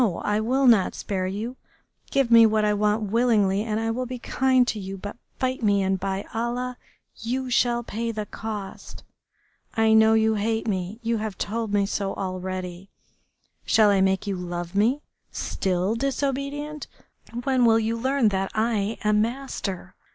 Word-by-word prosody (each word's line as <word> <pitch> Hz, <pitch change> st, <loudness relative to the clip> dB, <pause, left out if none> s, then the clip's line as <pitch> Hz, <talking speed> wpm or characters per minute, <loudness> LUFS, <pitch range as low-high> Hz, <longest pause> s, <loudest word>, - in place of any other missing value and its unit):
I 210 Hz, 0 st, +1 dB
will 255 Hz, +5 st, +1 dB
not 225 Hz, -7 st, +4 dB
spare 185 Hz, -2 st, -2 dB
you. 220 Hz, +7 st, -4 dB, 0.5 s
Give 275 Hz, -3 st, +1 dB
me 230 Hz, -1 st, +8 dB
what 215 Hz, 0 st, +2 dB
I 210 Hz, -, +2 dB
want 210 Hz, 0 st, 0 dB
willingly 210 Hz, -4 st, +3 dB
and 215 Hz, 0 st, -2 dB
I 225 Hz, 0 st, -1 dB
will 250 Hz, +2 st, -3 dB
be 250 Hz, +1 st, -5 dB
kind 255 Hz, 0 st, +2 dB
to 215 Hz, -, -2 dB
you, 195 Hz, 0 st, -6 dB
but 205 Hz, +2 st, -7 dB, 0.2 s
fight 255 Hz, -1 st, -1 dB
me, 200 Hz, -3 st, +3 dB
and 190 Hz, 0 st, 0 dB
by 195 Hz, +1 st, -3 dB
Allah! 245 Hz, +2 st, -2 dB, 0.4 s
you 250 Hz, +3 st, -3 dB
shall 240 Hz, 0 st, +2 dB
pay 230 Hz, +1 st, -3 dB
the 215 Hz, -1 st, -4 dB
cost!... 210 Hz, -2 st, -7 dB, 0.7 s
I 220 Hz, 0 st, +4 dB
know 220 Hz, 0 st, +6 dB
you 220 Hz, 0 st, +3 dB
hate 220 Hz, +2 st, -1 dB
me, 190 Hz, +1 st, -2 dB
you 230 Hz, 0 st, 0 dB
have 215 Hz, -2 st, -4 dB
told 225 Hz, +1 st, -3 dB
me 205 Hz, -1 st, +2 dB
so 195 Hz, -1 st, -2 dB
already. 185 Hz, 0 st, -5 dB, 0.7 s
Shall 215 Hz, -2 st, +4 dB
I 195 Hz, -1 st, +3 dB
make 190 Hz, +2 st, +1 dB
you 200 Hz, -2 st, -2 dB
love 175 Hz, -1 st, -5 dB
me?... 235 Hz, +9 st, +2 dB, 0.3 s
Still 185 Hz, +1 st, -1 dB
disobedient? 280 Hz, +3 st, -2 dB, 0.6 s
When 260 Hz, -2 st, +2 dB
will 225 Hz, -1 st, +5 dB
you 225 Hz, +1 st, 0 dB
learn 260 Hz, 0 st, +2 dB
that 195 Hz, -1 st, -1 dB
I 215 Hz, -1 st, 0 dB
am 210 Hz, 0 st, +3 dB
master?... 220 Hz, -6 st, -4 dB
220 Hz, 165 wpm, -25 LUFS, 195-240 Hz, 0.7 s, me